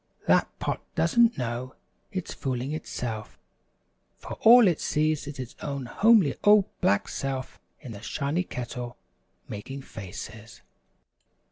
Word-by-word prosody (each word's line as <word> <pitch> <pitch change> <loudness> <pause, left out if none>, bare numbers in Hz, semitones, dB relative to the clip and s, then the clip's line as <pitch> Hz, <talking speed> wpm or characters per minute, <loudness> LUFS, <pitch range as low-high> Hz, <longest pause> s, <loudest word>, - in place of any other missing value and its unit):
That - - +4
Pot - - -2
doesn't 235 -1 +4
know 125 +1 -4 0.4
it's 185 -2 -4
fooling 130 +1 -3
itself, 120 -8 -5 0.8
for - - -8
all 235 -1 +9
it 170 -4 +1
sees 155 -1 0
is 145 -1 -6
its 125 -2 -7
own 140 -3 -4
homely 200 - +4
old 205 -1 +7 0.2
black 100 0 +2
self 135 -1 -4 0.2
in 125 - -8
the 100 -2 -9
shiny 145 +7 -1
Kettle 125 -4 -6 0.5
making 135 +7 -7
faces. 110 +2 -9
135 Hz, 125 wpm, -27 LUFS, 120-160 Hz, 0.8 s, all